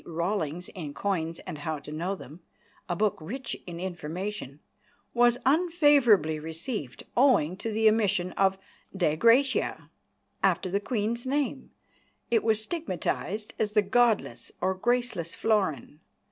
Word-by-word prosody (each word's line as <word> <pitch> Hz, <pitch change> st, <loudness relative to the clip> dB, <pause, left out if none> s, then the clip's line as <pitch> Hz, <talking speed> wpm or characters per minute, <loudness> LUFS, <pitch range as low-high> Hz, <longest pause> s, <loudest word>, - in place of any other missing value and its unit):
Rawlings 170 Hz, -1 st, -2 dB
in 150 Hz, -6 st, -7 dB
Coins 165 Hz, -5 st, -1 dB
and 150 Hz, -, -6 dB
How 160 Hz, 0 st, -3 dB
to 145 Hz, +1 st, -10 dB
Know 175 Hz, +6 st, -2 dB
Them, 155 Hz, -2 st, -12 dB, 0.5 s
a 175 Hz, -, 0 dB
book 210 Hz, +2 st, +1 dB
rich 255 Hz, -, -5 dB
in 170 Hz, -1 st, -6 dB
information, 175 Hz, -3 st, -5 dB, 0.5 s
"was 240 Hz, 0 st, +4 dB
unfavourably 280 Hz, -, +4 dB
received, 160 Hz, -, -5 dB
owing 240 Hz, -, +4 dB
to 225 Hz, +2 st, -4 dB
the 220 Hz, +1 st, +3 dB
omission 200 Hz, -5 st, +2 dB
of 195 Hz, 0 st, +2 dB, 0.4 s
'Dei 160 Hz, -5 st, +2 dB
Gratia' 240 Hz, -, +2 dB, 0.5 s
after 185 Hz, -, +1 dB
the 200 Hz, -, +1 dB
Queen's 230 Hz, +2 st, -2 dB
name, 280 Hz, -1 st, -1 dB, 0.6 s
and 230 Hz, -2 st, +4 dB
was 220 Hz, -1 st, +2 dB
stigmatised 215 Hz, -, -3 dB
as 210 Hz, -1 st, 0 dB
the 210 Hz, -1 st, +4 dB
godless 230 Hz, +2 st, +1 dB
or 190 Hz, -, +1 dB
graceless 235 Hz, -4 st, -1 dB
florin." 185 Hz, -, 0 dB
200 Hz, 130 wpm, -28 LUFS, 170-235 Hz, 0.6 s, was